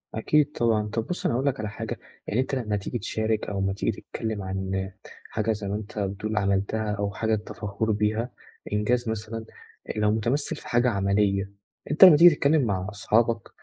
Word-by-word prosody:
أكيد 145 +6 +2
طبعًا، 110 -6 +1
طَب 110 +1 -3
بُصّ 180 - -3
أنا - - +2
هاقول 130 +3 0
لك 140 -5 0
على 105 -1 -3
حاجة، 110 +1 -5 0.3
يعني 110 - 0
أنت 130 +1 -2
لمّا 110 -5 -1
تيجي 100 +5 -4
تشارك 110 +1 -1
أو 100 -1 -3
لمّا 95 0 0
تيجي 100 - 0
تتكلّم 110 -3 -4
عن 95 0 -3 0.4
حاجة 110 +1 0
زي 105 -2 -3
ما 100 - -2
أنت 105 0 -6
بتقول 105 +2 -3
عملتها 100 +2 0
أو 100 -1 -2
حاجة 110 +3 -1
أنت 105 -1 -3
فخور 105 +1 -2
بيها، 110 +3 0 0.4
إنجاز 115 +3 +1
مثلًا 110 +1 -4 0.4
أ - - +1
لو 105 0 +3
متمثّل 120 +7 0
في - - -11
حاجة 120 +1 +3
عملية، 100 -1 +1 0.4
أنت 150 - +6
لمّا 180 -5 +11
تيجي 170 0 +8
تتكلّم 145 +2 +3
مع 95 -6 -1
أصحابك 115 +2 +1
110 Hz, 195 wpm, -26 LUFS, 100-115 Hz, 0.4 s, لمّا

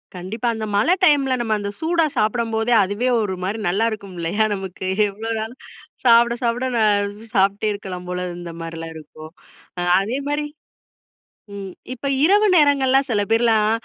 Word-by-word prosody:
கண்டிப்பா. 200 +7 -4
அந்த 220 - -4
மழ 205 +10 +2
டைம்ல 275 -3 +4
நம்ம 225 -2 0
அந்த 200 0 -4
சூடா 330 0 +2
சாப்டும்போதே 225 +1 0
அதுவே 205 +6 -2
ஒரு 205 -3 -2
மாரி 200 +4 -2
நல்லா 200 +6 +1
இருக்கும் 200 -3 -7
இல்லயா 185 +6 +1
நமக்கு, 190 -2 -6 0.2
எவ்வளோ 215 +3 -7
நாளும் 225 +4 -6 0.4
சாப்ட, 235 -1 +5
சாப்ட 240 +2 0
நான் 205 -2 +2 0.3
சாப்ட்டே 200 +2 +2
இருக்கலாம் 185 -3 -7
போல 180 0 -3
இருந்த 175 -1 -7
மாரிலா 165 0 -6
இருக்கும். 155 0 -11 0.7
அதே 225 +7 -2
மாரி 295 0 -1 1.1
ம் 195 -2 -7 0.2
இப்ப 255 +2 -4 0.2
இரவு 410 +5 +5
நேரங்கள்லாம் 275 -4 +4
சில 215 -4 +1
பேர்லாம் 225 -2 +3
220 Hz, 145 wpm, -21 LUFS, 195-245 Hz, 1.1 s, சாப்ட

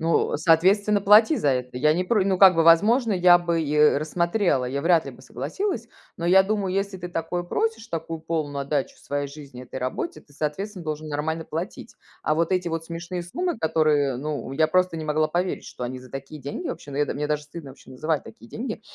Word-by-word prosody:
Ну, 165 -1 +1
соответственно, 190 +7 +3
плати 210 +8 +6
за 145 - 0
это. 125 -1 -1
Я 150 +4 +3
не 180 +3 -1
про 210 -1 +2
ну, 190 -1 +1
как 190 -2 +8
бы, 165 - +3
возможно, 215 +9 +5
я 180 -1 +6
бы 170 -1 -1
и 150 -1 -1 0.2
рассмотрела, 170 -1 0
я 135 +3 -2
вряд 165 +1 +3
ли - - -5
бы - - -16
согласилась, 380 - -4 0.3
но 170 - -5
я 190 +2 +6
думаю, 200 -2 -1
если 195 0 -2
ты 180 - -6
такое 175 +1 -3
просишь, 225 +5 -2
такую 165 -2 -5
полную 155 -3 -3
отдачу 140 -1 -2
своей 145 0 -3
жизни 140 -3 -11
этой 130 - -7
работе, 130 - -4
ты, 145 - -24
соответственно, 175 +6 -4
должен 155 0 -4
нормально 160 +2 -2
платить. 175 +9 -6 0.3
А 155 - +1
вот 165 +2 +1
эти 180 -2 0
вот 165 0 -3
смешные 170 +2 -5
суммы, 345 - -3
которые 155 -5 +2
ну, 145 0 -4
я 155 +3 +2
просто 185 0 +2
не 155 - -5
могла 155 +1 +1
поверить, 175 +4 -2
что - - -9
они 130 +1 -4
за 125 0 -14
такие 135 +2 -8
деньги 140 +2 -5
вообще, 145 - -7
но 140 - -4
я 145 - +3
да - - -4
мне 150 +1 -2
даже 150 0 -1
стыдно 150 -1 -10
вообще 130 - -16
называть 150 +3 -2
такие 115 +1 -14
деньги. 225 -2 -5
165 Hz, 220 wpm, -24 LUFS, 145-185 Hz, 0.3 s, как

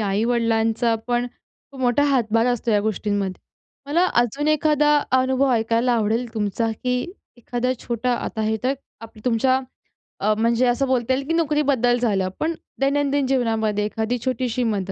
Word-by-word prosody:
आई-वडिलांचा 225 +2 +1
पण, 240 0 +1
खूप 265 +2 -17
मोठा 250 +2 +2
हातभार 230 -2 +2
असतो 245 -1 0
या 210 -1 +3
गोष्टींमध्ये. 205 -2 -2 0.5
मला 335 +5 +2 0.2
अजून 280 +6 -2
एखादा 300 -1 +3 0.2
अनुभव 260 +1 +2
ऐकायला 230 +2 +1
आवडेल 225 +1 0
तुमचा, 220 +1 -1
की 250 +3 -2 0.4
एखादा 245 +2 -2
छोटा, 240 +1 -1
आता 230 -1 -4
हे 220 +1 0
तर, 265 +2 +2 0.3
आपलं, 225 -1 -13
तुमच्या 255 +2 +2 0.6
अ, 215 +2 +3
म्हणजे 235 +2 +2
असं 250 +3 +1
बोलता 255 -1 +1
येईल 270 +1 -2
की 330 - 0
नोकरीबद्दल 285 -7 +2
झालं. 195 -6 0
पण 325 +2 0 0.3
दैनंदिन 280 0 +1
जीवनामध्ये 225 -5 0
एखादी 220 +3 -2
छोटीशी 255 -1 -1
मदत, 200 -4 -1
240 Hz, 150 wpm, -22 LUFS, 220-260 Hz, 0.6 s, या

